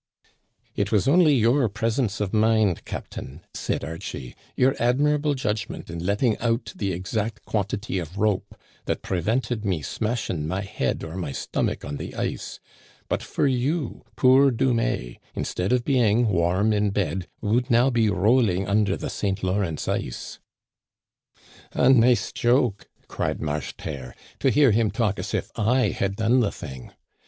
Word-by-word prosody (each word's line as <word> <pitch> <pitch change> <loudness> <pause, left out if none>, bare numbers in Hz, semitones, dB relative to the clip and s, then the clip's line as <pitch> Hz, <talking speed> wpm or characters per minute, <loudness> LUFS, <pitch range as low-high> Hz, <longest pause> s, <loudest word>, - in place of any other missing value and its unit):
" - - -48 0.3
It 100 +1 -1
was 105 -1 +2
only 155 0 +5
your 120 +1 +3
presence 110 +1 -1
of 105 -1 -2
mind, 110 -4 +2
captain," 70 +6 -7
said - - -2
Archie, 70 -5 -6
" - - -31
your 130 +1 +3
admirable 145 +4 +2
judgment 110 -9 -3
in 85 0 -5
letting 105 +4 +1
out 115 +1 -1
the 100 -2 -2
ex 95 +5 -5
act 110 0 -2
quantity 100 -1 -2
of 85 +2 -7
rope, 105 -2 0 0.3
that - - -2
prevented 110 +5 -1
me 90 -7 -1
smashing 105 - -2
my 95 +4 -2
head 100 - -2
or 80 +1 -6
my 90 -6 -3
stomach - - -2
on 70 0 -4
the - - -7
ice; - - -3 0.4
and - - -35
but - - 0
for - - -1
you, 135 +2 -1
poor 135 +2 +6
Dumais, 115 - 0 0.2
instead 90 +4 -2
of 125 -1 +2
being 120 -4 +3
warm 95 +4 +2
in 105 0 +2
bed 95 -3 -2
would 115 +4 0
now 120 +3 +4
be 115 -3 +2
rolling 100 -1 +2
under 100 -1 +2
the - - -4
St. 100 -1 -2
Lawrence 95 -4 -1
ice." - - -3 1.3
A 130 - +4
nice 125 -1 +4
joke," 120 -4 +1 0.2
cried - - -2
Marcheterre; 75 -3 -5 0.2
"to 135 - +3
hear 140 -2 +5
him 110 0 +2
talk 105 -4 0
as - - -3
if - - -3
I 115 +1 +2
had 100 0 -2
done 115 +4 +3
the 110 -5 +2
thing 65 -4 -9
110 Hz, 160 wpm, -24 LUFS, 95-120 Hz, 1.3 s, poor